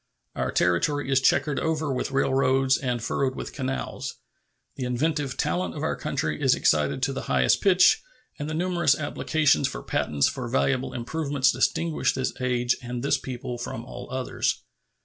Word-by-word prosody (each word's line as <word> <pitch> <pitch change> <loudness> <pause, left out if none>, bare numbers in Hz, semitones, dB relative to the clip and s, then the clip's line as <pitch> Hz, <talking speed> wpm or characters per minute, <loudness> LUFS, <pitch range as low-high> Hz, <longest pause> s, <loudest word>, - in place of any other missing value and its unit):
Our - - -1
territory 135 - +1
is 135 -1 +4
checkered 140 +2 +2
over 155 -3 -1
with 125 - -2
railroads 135 0 +2
and 125 -3 -2
furrowed 130 +2 -1
with - - -6
canals. 135 -1 -4 0.6
The 130 - -4
inventive 140 +2 -1
talent 90 0 -1
of - - -5
our - - 0
country - - -2
is - - +4
excited 75 - +1
to 135 +1 +1
the 135 - -4
highest - - +3
pitch, 185 -2 +5 0.4
and 145 +1 -3
the 155 - -3
numerous 170 -4 +2
applications 150 - +1
for - - -6
patents 70 -2 +1
for 130 -3 -4
valuable 130 +1 0
improvements 140 +1 0
distinguish 165 -2 +1
this 130 -1 -2
age 125 -1 +1
and 120 0 -5
this 140 -1 +2
people 125 -2 -6
from 120 -1 -5
all - - -9
others. 130 0 -1
130 Hz, 165 wpm, -26 LUFS, 125-145 Hz, 0.6 s, pitch